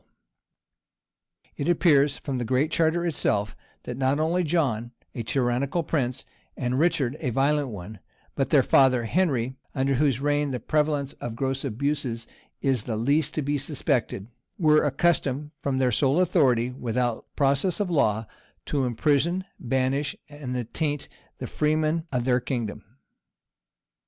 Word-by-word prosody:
] - - -65 0.3
It 140 - -1
appears 150 -5 +4
from 135 -4 -4
the - - -1
Great 130 +6 +1
Charter 165 +2 +1
itself, 110 -10 0 0.3
that 125 - -6
not 135 +2 +2
only 170 +3 +1
John, 130 -8 0 0.2
a 120 - -4
tyrannical 125 +6 0
prince, 130 -5 -2 0.3
and 125 0 -1
Richard, 150 -5 +1
a 140 - -2
violent 140 +4 +1
one, 100 -1 -8 0.3
but - - -1
their - - +5
father, 130 -3 +4
Henry, 130 -5 0 0.2
under 135 0 +1
whose 135 -2 +2
reign 145 0 +1
the 125 -2 -3
prevalence 150 +1 0
of 115 -2 -4
gross 135 +1 -2
abuses 130 -2 -2 0.4
is 130 -6 +1
the 115 - -2
least 140 +7 +1
to 155 - -1
be 145 +1 0
suspected, 135 - -1 0.3
were 155 -4 +4
accustomed, 145 -1 +1
from 135 -2 -1
their 130 -1 +2
sole 135 +7 +2
authority, 135 -10 +3
without 120 -1 -2
process 140 +7 +2
of 200 -4 -1
law, 110 -8 +2 0.4
to 140 -3 0
imprison, 150 +9 +1
banish, 130 +3 0
and 145 -4 -5
attaint 145 +5 -3 0.3
the - - -5
freemen 155 +2 0
of 125 -3 -1
their 125 -1 +3
kingdom. 120 -4 -4
135 Hz, 145 wpm, -26 LUFS, 125-150 Hz, 0.4 s, their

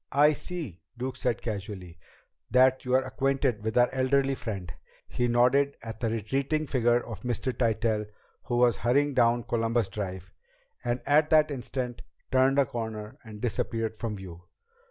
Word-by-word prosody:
"I 150 +2 +5
see," 150 - -6 0.2
Duke 130 +2 -3
said 125 -2 -1
casually, 95 -5 -6 0.5
"that 130 +1 +4
you 125 0 +2
are 130 - +4
acquainted 130 -4 0
with 110 +1 -1
our 120 0 +6
elderly 135 +1 +2
friend." 100 -8 -5 0.3
He 125 - -1
nodded 125 +4 +3
at 110 -1 -7
the 115 - 0
retreating 135 +8 -1
figure 120 -3 +2
of 115 -3 -7
Mr. 125 +1 -2
Tytell 110 -2 0 0.4
who 120 -2 -1
was 120 -1 +4
hurrying 140 +4 +2
down 120 -2 +3
Columbus 115 -2 0
Drive, 95 -3 -6 0.5
and 120 +1 -1
at 150 +2 +4
that 155 -1 +5
instant, 125 -1 -4 0.3
turned 130 +1 +4
a 140 - +5
corner 110 -3 -6
and 105 -2 -10
disappeared 115 -1 -1
from 110 -1 -4
view. 90 -3 -9
120 Hz, 155 wpm, -28 LUFS, 110-130 Hz, 0.5 s, our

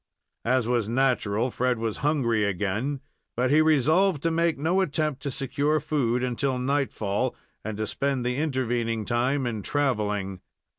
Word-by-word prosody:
As 125 -1 +2
was 120 -3 0
natural, 120 -2 +1
Fred 125 0 0
was 110 -1 -2
hungry 130 -7 +1
again, 105 +8 -1 0.4
but 125 +1 +2
he 155 +2 +6
resolved 155 +3 +3
to 165 - +2
make 165 0 +1
no 165 +7 +1
attempt 150 -4 -1
to 140 - -3
secure 145 +3 0
food 130 -5 0
until 130 +1 0
night 140 +2 0
fall, 105 +5 -1 0.3
and 110 -1 -4
to 110 - -1
spend 135 +2 -1
the 125 +1 0
intervening 120 -6 -1
time 125 +4 0
in 115 -3 -2
traveling. 105 -8 -1
130 Hz, 155 wpm, -26 LUFS, 115-145 Hz, 0.4 s, he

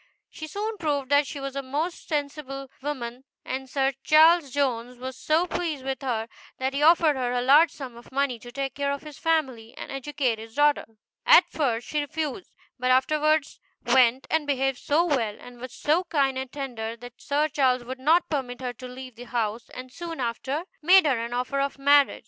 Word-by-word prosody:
She 310 - -8
soon 425 +6 -4
proved 285 -5 -1
that 285 0 +4
she 285 - -6
was 275 0 -5
a 275 - -2
most 295 +6 -4
sensible 280 -3 -4
woman, 260 -3 -5 0.2
and 265 0 -4
Sir 270 0 +1
Charles 320 0 +6
Jones 250 -3 -1
was 260 +1 -6
so 315 +6 +1
pleased 320 -7 -3
with 270 +1 -3
her, 230 -4 -2 0.3
that 265 +1 -2
he 280 - -1
offered 320 -1 +5
her 250 -2 -1
a 245 - 0
large 295 +6 +6
sum 265 -5 -9
of 235 - -14
money 270 -3 0
to 240 +2 -11
take 270 0 -3
care 280 0 -1
of 280 +1 -4
his 300 -2 -11
family, 260 -8 -1
and - - -7
educate 270 -4 -1
his 225 0 -11
daughter. 295 0 +3 0.4
At 480 -8 +8
first 245 -6 -1
she 300 - -1
refused, 305 +3 -4 0.3
but 255 0 0
afterwards 305 +3 +2 0.3
went 250 +1 +4
and 315 -2 +1
behaved 270 -2 0
so 315 +4 +2
well, 235 -10 0
and 245 -1 -13
was 255 0 -7
so 315 +8 +1
kind 275 -6 +1
and 260 -1 -5
tender, 235 -5 -5
that 245 +1 -12
Sir 295 +2 +1
Charles 260 -4 +1
would 260 +2 -7
not 325 +6 +3
permit 255 -6 -3
her 250 -2 -4
to 255 +2 -10
leave 255 0 -9
the 245 - -9
house, 230 -1 -3
and 255 0 -9
soon 335 0 -6
after 260 +5 -2 0.2
made 360 +3 +6
her 255 -6 +1
an 235 - -5
offer 250 +3 -1
of 275 0 -1
marriage. 285 0 +4
275 Hz, 200 wpm, -26 LUFS, 250-300 Hz, 0.4 s, At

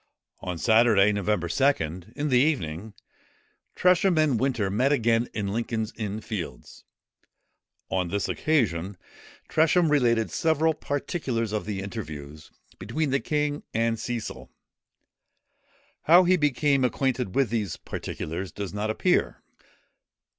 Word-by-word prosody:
On 90 -2 -5
Saturday, 110 -1 +4
November 100 -3 -1
2nd, 90 - 0
in 150 +1 -2
the 125 -2 +4
evening, 105 - -1 0.8
Tresham 180 0 +3
and 150 -7 +3
Winter 120 -7 0
met 125 +7 +2
again 120 -3 +2
in 100 -2 -3
Lincoln's 115 -1 -2
Inn 110 -1 -4
Fields. 85 - -7 1.1
On 95 -2 0
this 100 +3 -2
occasion, 100 - 0 0.5
Tresham 165 +1 +3
related 115 -6 +2
several 160 -1 +2
particulars 135 -7 -3
of 105 -4 -2
the 100 -2 -3
interviews 75 -8 -8 0.3
between 155 -2 -2
the 135 - +2
king 150 0 -1
and 115 0 +1
Cecil. 120 -2 -5 1.6
How 175 +4 +7
he 185 +1 +4
became 145 -3 +2
acquainted 125 -4 -1
with 135 -5 +2
these 105 -7 -2
particulars 90 +4 -5
does 100 -1 -6
not 105 +1 -2
appear. 110 - 0
115 Hz, 120 wpm, -26 LUFS, 100-145 Hz, 1.6 s, How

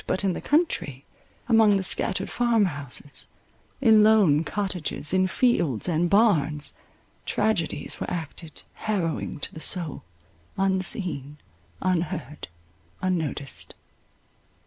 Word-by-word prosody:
But 190 - -1
in 190 -2 +1
the - - -6
country, 280 - 0 0.4
among 220 -4 +5
the 190 - -2
scattered 185 - 0
farm 235 -3 +2
houses, 145 -3 -5 0.5
in 220 -4 +6
lone 200 -9 +4
cottages, 180 -5 -2
in 185 0 +3
fields, 175 - +1
and 170 0 +1
barns, 160 -9 +2 0.5
tragedies 210 -9 -1
were - - -4
acted 165 -1 -6
harrowing 180 -9 -3
to - - -3
the 160 - -8
soul, 170 -1 +2 0.6
unseen, 185 -6 0 0.5
unheard, 165 -6 -2 0.5
unnoticed. 160 -7 -3
180 Hz, 105 wpm, -25 LUFS, 150-205 Hz, 0.6 s, in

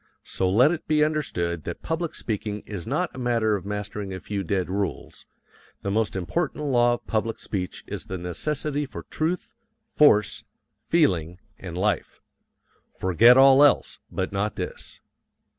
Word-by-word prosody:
So 95 - -1
let 125 - +5
it 175 - -4
be 150 -1 +3
understood 85 - -1
that 85 - -6
public 165 0 -2
speaking 105 -1 -3
is 100 -4 -7
not 155 +7 -1
a - - -7
matter 115 -3 +1
of 100 -1 -6
mastering 105 -1 -4
a 95 - -5
few 100 0 -4
dead 95 +1 -1
rules; 100 0 -4 0.6
the 100 - -1
most 110 0 0
important 150 - -2
law 120 -3 +3
of - - -14
public 115 +1 -1
speech 90 -3 -4
is - - -6
the 95 - -4
necessity 145 - -2
for - - -8
truth, 165 +3 -2 0.4
force, 105 -9 +4 0.4
feeling, 90 - +1 0.2
and 90 -3 -7
life. 105 +3 -1 0.8
Forget 115 +7 +6
all 135 +1 +8
else, 145 - +3
but 95 - -2
not 105 +2 -1
this. - - -6
105 Hz, 155 wpm, -25 LUFS, 95-145 Hz, 0.8 s, all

